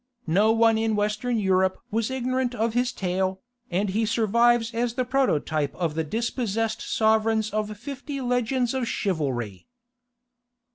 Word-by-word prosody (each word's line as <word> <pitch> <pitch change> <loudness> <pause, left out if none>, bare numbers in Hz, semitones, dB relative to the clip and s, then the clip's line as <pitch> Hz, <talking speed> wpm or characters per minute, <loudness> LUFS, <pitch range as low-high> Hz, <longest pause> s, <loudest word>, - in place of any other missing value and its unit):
No 200 +7 +3
one 225 0 +4
in 220 -1 +1
Western 210 +4 0
Europe 190 -2 +2
was 225 +2 0
ignorant 255 -1 -1
of 225 0 0
his 245 +1 +1
tale, 185 0 -1 0.3
and 190 +3 0
he 215 +4 0
survives 230 +1 +2
as 235 0 -1
the 255 -1 0
prototype 160 - 0
of 170 -4 -1
the 160 +1 -1
dispossessed 225 - -2
sovereigns 220 -1 +1
of 215 0 -2
fifty 280 +3 -6
legends 245 0 0
of 260 -3 -1
chivalry. 130 - -2
220 Hz, 140 wpm, -25 LUFS, 190-245 Hz, 0.3 s, one